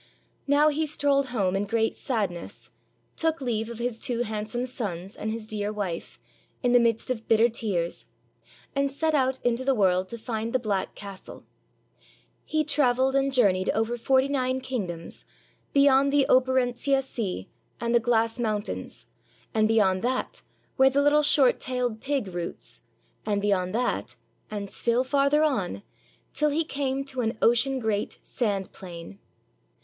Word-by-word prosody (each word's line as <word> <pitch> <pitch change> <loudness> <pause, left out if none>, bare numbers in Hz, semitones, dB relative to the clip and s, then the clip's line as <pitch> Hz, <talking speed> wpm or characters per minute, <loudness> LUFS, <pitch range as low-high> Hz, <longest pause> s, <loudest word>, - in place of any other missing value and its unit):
Now 290 +2 +5
he 310 +1 0
strolled 280 -2 +1
home 200 -7 0
in 200 +1 0
great 225 +1 0
sadness, 200 -9 -4 0.4
took 320 0 0
leave 230 -4 -2
of 235 - -7
his 240 -1 -3
two 240 -1 0
handsome 220 +3 -3
sons 195 -7 -5
and 215 - -4
his 220 -1 -6
dear 210 -1 -2
wife, 195 -5 -5 0.4
in 245 - +3
the 245 - +6
midst 230 +1 +1
of 225 -3 -4
bitter 225 +1 +5
tears, 195 -7 -1 0.7
and 275 0 +1
set 315 +3 0
out 265 -2 +2
into 245 +1 +1
the 270 0 +2
world 185 -3 +2
to 235 - -5
find 225 0 -4
the - - +4
black 210 -6 -2
castle. 200 -2 -10 1.0
He 310 0 0
traveled 265 -3 +2
and 275 0 +2
journeyed 195 -8 +3
over 225 +2 0
forty 260 +3 +2
nine 260 -2 0
king 250 -7 -3
doms, 170 -1 -7 0.5
beyond 280 0 +4
the 285 -1 +4
Operentsia 260 +1 +2
Sea 200 - -4 0.3
and 235 0 -1
the 235 - +6
glass 230 0 +1
moun 215 -3 0
tains, 105 - -6 0.5
and 215 -1 +3
beyond 200 -4 +3
that, 255 +3 -2 0.4
where 265 0 +6
the 280 +1 +2
little 295 +1 +5
short 285 -3 +4
tailed 250 -3 -2
pig 275 -4 -1
roots, 175 -2 -6 0.4
and 205 -2 0
beyond 195 -2 0
that, 245 +1 -1 0.3
and 205 -1 -4
still 235 +5 +1
farther 280 +3 +2
on, 205 - -1 0.5
till 300 0 +2
he 310 +3 +1
came 275 -2 -2
to 265 -2 -2
an 225 -1 -1
ocean 255 +3 +3
great 220 -4 -2
sand 200 -5 -2
plain. 180 +1 -10
235 Hz, 160 wpm, -26 LUFS, 210-270 Hz, 1.0 s, the